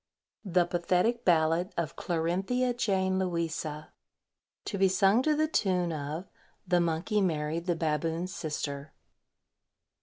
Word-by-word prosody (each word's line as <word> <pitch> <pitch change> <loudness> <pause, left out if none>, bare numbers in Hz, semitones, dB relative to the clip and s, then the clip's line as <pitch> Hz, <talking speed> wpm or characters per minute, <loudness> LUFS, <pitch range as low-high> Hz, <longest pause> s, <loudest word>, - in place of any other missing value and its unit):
THE 180 -2 +3
PATHETIC 180 +7 0
BALLAD 165 +2 +2
OF 170 -3 -2
CLARINTHIA 190 +9 0
JANE 190 -5 +1
LOUISA. 165 -4 -3 0.8
(_To 200 - -3
be 195 - +5
sung 195 +4 +4
to 305 +3 +2
the 310 +1 +2
tune 180 - +1
of 155 +4 -4 0.4
"The 175 -1 +3
Monkey 170 +6 0
married 165 -1 -1
the 175 - +2
Baboon's 165 +3 -1
Sister." 150 -3 -4
175 Hz, 120 wpm, -29 LUFS, 160-190 Hz, 0.8 s, be